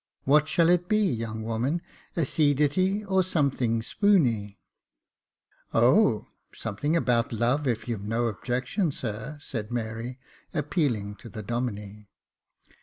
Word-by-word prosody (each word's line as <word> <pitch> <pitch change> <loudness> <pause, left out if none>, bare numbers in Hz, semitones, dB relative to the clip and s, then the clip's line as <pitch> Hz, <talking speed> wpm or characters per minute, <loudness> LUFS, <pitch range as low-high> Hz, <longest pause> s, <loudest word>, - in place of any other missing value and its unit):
What 150 +2 +4
shall 165 +2 +3
it 175 0 +2
be, 215 - +4
young 115 - -1
woman, 120 +9 -1 0.3
a 165 - +1
sea 145 +1 +3
ditty, 185 +9 +1
or 190 -1 +3
something 135 -10 +1
spooney? 120 - +2 0.4
" - - -63
" - - -36
O! - - +4 0.3
something 110 +10 -2
about 120 -6 +1
love, 120 +6 +1
if 110 -2 -1
you've 105 -4 -4
no 115 +2 0
objection, 125 - -1
sir," 120 +4 -5
said 110 -7 -5
Mary, 120 +1 -4 0.4
appealing 120 - -1
to 115 - -11
the 110 +1 -7
Domine. 105 -3 -4
125 Hz, 135 wpm, -27 LUFS, 110-155 Hz, 0.4 s, What